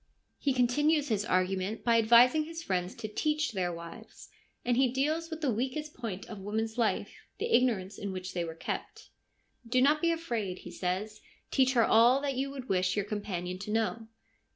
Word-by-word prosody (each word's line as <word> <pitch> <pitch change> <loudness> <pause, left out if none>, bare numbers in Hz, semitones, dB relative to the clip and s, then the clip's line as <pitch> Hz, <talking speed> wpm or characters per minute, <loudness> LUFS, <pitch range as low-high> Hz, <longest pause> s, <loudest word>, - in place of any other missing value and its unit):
He 280 - +1
continues 290 +4 +2
his 210 -2 0
argument 185 +1 0
by 230 -1 +4
advising 240 +7 +6
his 330 +1 -7
friends 180 - -2
to 215 - -5
teach 305 +7 0
their 185 -4 -1
wives; 170 0 -10 0.4
and 245 -1 +2
he 260 +1 +4
deals 310 +5 0
with 320 -1 -6
the 275 -6 +1
weakest 265 +7 -3
point 220 -6 -6
in 205 -4 -8
woman's 220 +2 -2
life 235 -3 0
— - - -42
the 460 0 +2
ignorance 210 -6 +1
in 200 -1 -4
which 185 0 -6
they 175 - -1
were 165 -1 -6
kept. - - -6 0.3
' 235 - -23
Do 255 +2 +3
not 295 +4 +4
be 335 - +3
afraid,' 235 - -2
he - - -7
says; 200 +4 -3
' - - -37
teach 260 -1 +3
her 235 -3 +4
all 240 +4 +5
that 280 -1 -1
you 270 +2 -1
would 270 -2 -8
wish 185 -1 +1
your 205 -2 0
companion 185 -4 -4
to 205 - -7
know.' 225 0 -1
230 Hz, 200 wpm, -30 LUFS, 195-270 Hz, 0.4 s, advising